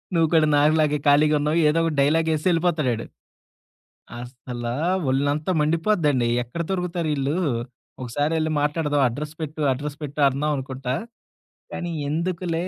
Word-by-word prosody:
నువ్వు 165 -1 +4
కూడా 160 -2 +5
నాకులాగే 150 0 +3
ఖాళీగున్నావు 150 +1 +3
ఏదో 160 +2 +2
ఒకటి 165 -2 -1
డైలాగేసి 155 +1 +1
ఎళ్ళిపోతడాడు. 160 -9 0 1.1
అస్సలా 120 -1 -6 0.4
ఒళ్ళంతా 145 +5 0
మండిపోద్దండి. 155 - +1 0.2
ఎక్కడ 125 +8 -5
దొరుకుతారీళ్ళు? 165 -6 -1 0.7
ఒకసారెళ్ళి 155 +6 -1
మాట్లాడదాం 150 -1 0
అడ్రస్ 150 +6 -6
పెట్టు 155 0 -5
అడ్రస్ 145 +2 -6
పెట్టు 145 +1 -6
అందాం 145 +3 -1
అనుకుంటా. 130 -1 -4 0.8
కానీ, 175 -1 -4 0.2
ఎందుకులే... 170 +1 -2
150 Hz, 110 wpm, -23 LUFS, 140-165 Hz, 1.1 s, కూడా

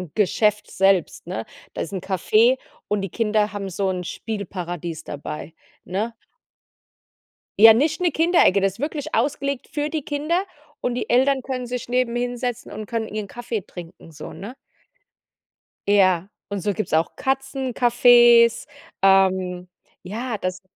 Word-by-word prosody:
Geschäft 210 +1 +1
selbst, 195 -2 +1
ne? 110 - -4 0.3
Da - - -4
ist 165 - -5
'n 190 - -2
Café 215 +7 +3 0.3
und 210 -1 0
die 195 - -4
Kinder 215 0 0
haben 200 -1 -4
so 190 +1 -1
'n 180 -1 -3
Spielparadies 175 -5 -5
dabei, 150 +2 -7 0.3
ne? 215 +6 -3 1.4
Ja, 225 +1 +10
nicht 300 +8 +1
'ne 355 -2 +2
Kinderecke. 325 - +4
Das 195 -1 +1
ist 195 - -18
wirklich 295 -1 -3
ausgelegt 280 -2 -1
für 295 0 -2
die 310 0 -2
Kinder 305 +5 -1 0.4
und 245 - -1
die 245 - -4
Eltern 265 +2 +3
können 255 -1 -4
sich 250 0 -5
neben 245 -1 0
hinsetzen 245 0 -3
und 215 - -6
können 225 +1 -3
ihren 215 -1 -5
Kaffee 235 0 -4
trinken 170 -2 -11
so, 155 0 -9
ne? 215 +7 -9 1.3
Ja, 190 -2 +3 0.2
und 200 -1 -3
so 205 +3 0
gibt's 215 -2 -4
auch 160 +1 +1
Katzencafés, 245 -3 +4 0.4
ähm 190 -2 +3 0.3
ja, 225 +5 -4
das 185 0 -3
215 Hz, 145 wpm, -22 LUFS, 190-250 Hz, 1.4 s, Ja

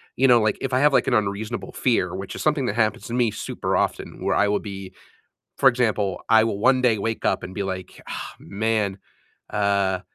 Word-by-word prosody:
You 135 - +3
know, 120 -2 +6
like 110 0 +1
if 135 - -3
I 130 - +3
have, 145 +1 +4
like, - - +4
an 130 - +1
unreasonable 105 +1 -2
fear, 95 -8 0
which 95 0 -6
is - - -5
something 150 -3 +1
that 105 - -2
happens 110 -2 0
to 115 - -6
me 120 -2 +2
super - - -3
often, - - -2
where - - +1
I 105 - +3
will 105 0 +1
be 95 -2 -8 0.7
For 135 - +6
example, 110 -6 0
I 110 -1 +6
will 110 -3 -2
one 130 +4 +3
day 115 -4 +3
wake 115 +2 -3
up - - +1
and 95 - -7
be 100 - -2
like, 95 -2 -6
"Ah, - - -6
man, 105 -1 -1 0.5
uh" 100 -2 +1
110 Hz, 220 wpm, -23 LUFS, 100-120 Hz, 0.7 s, know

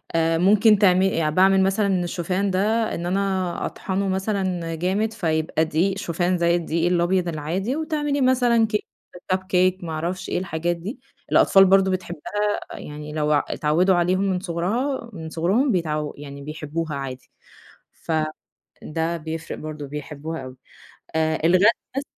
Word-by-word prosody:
آآ 165 0 +2
ممكن 210 +4 +5
تعمل 185 -5 +3
باعمل 190 +3 +4
مثلًا 195 -2 +1
الشوفان 180 +3 -1
ده 215 +4 +1
إن 170 - -4
أنا 190 -1 -1
أطحنه 195 +1 -2
مثلًا 190 -3 -1
جامد 195 +7 0
فيبقى 160 -5 0
دقيق 175 +5 0
شوفان 175 0 0
زي 170 0 +2
الدقيق 170 0 0
الأبيض 175 +1 +1
العادي، 170 - -2
وتعملي 295 -2 -1
مثلًا 245 -3 +3
كيك، 215 -1 -2 0.4
كب 185 0 +1
كيك، 185 0 +1
ما 165 - -5
أعرفش 170 +4 -3
إيه، - - -1
الحاجات 175 -1 -2
دي 185 - -7 0.3
الأطفال 195 0 +6
برضه 195 0 +4
بتحبها 185 +3 -2
يعني 150 0 -8
لو 150 -1 +1
آآ 145 - +3
اتعودوا 175 +5 +2
عليهم 180 +2 +2
من 190 -2 0
صغرها 215 +9 -2
من 160 -3 -7
صغرهم 195 - +1
بيتعو 155 -5 -1
يعني 140 -1 -9
بيحبوها 155 +1 -4
عادي، 135 -2 -7 0.6
ف - - -8 0.7
ده 165 +2 -2
بيفرق 160 0 -6
برضه 155 -1 -6
بيحبوها 150 +2 -6
أوي 130 0 -10 0.6
آآ 160 0 +1
الغدا 185 +4 +5 0.3
بس 275 - -1
180 Hz, 145 wpm, -23 LUFS, 160-195 Hz, 0.7 s, الأطفال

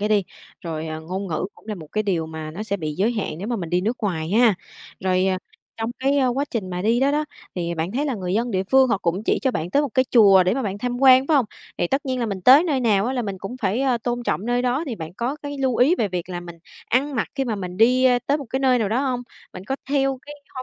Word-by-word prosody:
cái 210 - 0
đi, 205 -3 +2 0.4
rồi, 160 -2 -5
ờ, 155 0 -5
ngôn 185 +4 -5
ngữ 160 +3 -2
cũng - - -21
là 215 - -2
một 160 -4 -10
cái 215 - 0
điều 175 -6 -1
mà 160 -1 -7
nó 185 +7 -6
sẽ 200 -2 -2
bị 155 -4 -4
giới 210 +8 +1
hạn 190 -8 -3
nếu 200 +5 -5
mà 240 - -1
mình 170 -5 -5
đi 180 +1 +2
nước 225 +6 -1
ngoài 175 -6 -2
ha. 225 0 +5 0.5
Rồi, 185 0 +1
à, 185 -1 +1 0.4
trong 225 +1 -3
cái, 275 +2 +2
a, 265 - +3
quá 270 +4 0
trình 205 -7 -3
mà 180 0 -3
đi 230 +4 +2
đó 275 +2 +3
đó, 300 +1 +1 0.3
thì 170 -1 -2
bạn 165 +5 -3
thấy 285 +4 -1
là 270 - -1
người 185 -3 -3
dân 235 +2 0
địa 190 -2 0
phương 265 +5 +4
họ 200 - +1
cũng 180 +2 -1
chỉ - - +2
cho 265 - +2
bạn 170 -6 -3
tới 285 - +3
một 290 - -1
cái 260 - +4
chùa 200 -6 +7
để 185 +3 +1
mà 265 - -1
bạn 200 -2 -3
tham 245 +2 -3
quan, 260 0 +7
phải 310 - +3
hông? 260 -5 +2 0.3
Thì - - +1
tất 275 +1 -1
nhiên 255 -1 -1
là 235 - 0
mình 200 -3 -4
tới 275 - +8
nơi 285 -7 0
nào 210 -3 +2
á 255 - -1
là 250 - -1
mình 200 -3 -5
cũng 220 +7 -6
phải, 205 +5 +1
ờ, 255 -3 +1
tôn 240 +1 -3
trọng 215 -3 -2
nơi 245 0 +1
đó 255 +6 0
thì 255 - -3
bạn 160 -1 -8
có 245 +7 -2
cái 285 0 -5
lưu 260 -3 +1
ý 275 +8 +5
về 215 - 0
việc 180 -1 -4
là 175 -1 -4
mình 170 -1 -10 0.3
ăn 275 +4 +1
mặc - - -1
khi 270 - -1
mà 235 -4 -2
mình 180 -2 -6
đi, 250 +5 +4
ơ, 250 -1 +5
tới 285 +2 +2
một 280 - -7
cái 265 - -1
nơi 260 -2 +3
nào 215 -4 0
đó 230 +4 +1
hông? 245 -1 -2 0.3
Bạn 185 - -9
có 265 +6 -2
theo 270 -2 +1
cái, 295 - -8 0.2
hơ, 255 - -5
225 Hz, 310 wpm, -22 LUFS, 185-260 Hz, 0.5 s, tới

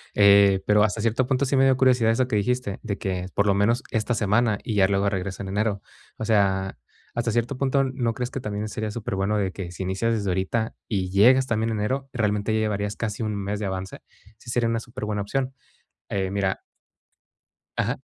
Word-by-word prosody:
Eh, 100 -1 +6
pero 105 0 +4
hasta 110 0 0
cierto 115 +3 +1
punto, 130 0 +1
sí 135 - 0
me 135 - +5
dio 135 -1 +5
curiosidad 125 -3 +4
eso 125 +2 +1
que 105 - +1
dijiste, 125 -1 -1
de 100 -2 -3
que 90 -2 -3
por 100 - +2
lo 100 - +4
menos 115 +6 +2
esta 110 +2 0
semana 110 0 +2
y 110 - -3
ya 95 -1 +5
luego 100 0 +1
regreso 95 0 -4
en 95 - -6
enero. 105 0 -1 0.4
O - - -5
sea, 95 -3 +1 0.4
hasta 120 -1 -1
cierto 120 +3 -1
punto, 135 0 +2
¿no 125 -3 -1
crees 125 0 -4
que 135 - -4
también 105 -1 -4
sería 110 0 -3
superbueno 105 -2 -1
de 95 -2 0
que 90 -3 -6
si 95 - -5
inicias 95 +5 0
desde 100 -3 -1
ahorita 95 +5 -1
y 95 -4 -1
llegas 125 +7 +5
también 115 -2 0
en 105 - -2
enero, 135 +6 -2
realmente, 105 -2 0
ya 110 - +2
llevarías 105 -1 -1
casi 110 -1 -4
un 105 -2 -1
mes 100 +1 -3
de 105 - -3
avance? 95 0 -5 0.4
Sí 120 - -13
sería 120 -1 +1
una 115 0 0
superbuena 110 -4 -4
opción. 130 +5 -2 0.6
Eh, 95 -1 -1
mira 95 -1 -1 1.2
Ajá. - - -1
105 Hz, 210 wpm, -24 LUFS, 100-120 Hz, 1.2 s, Eh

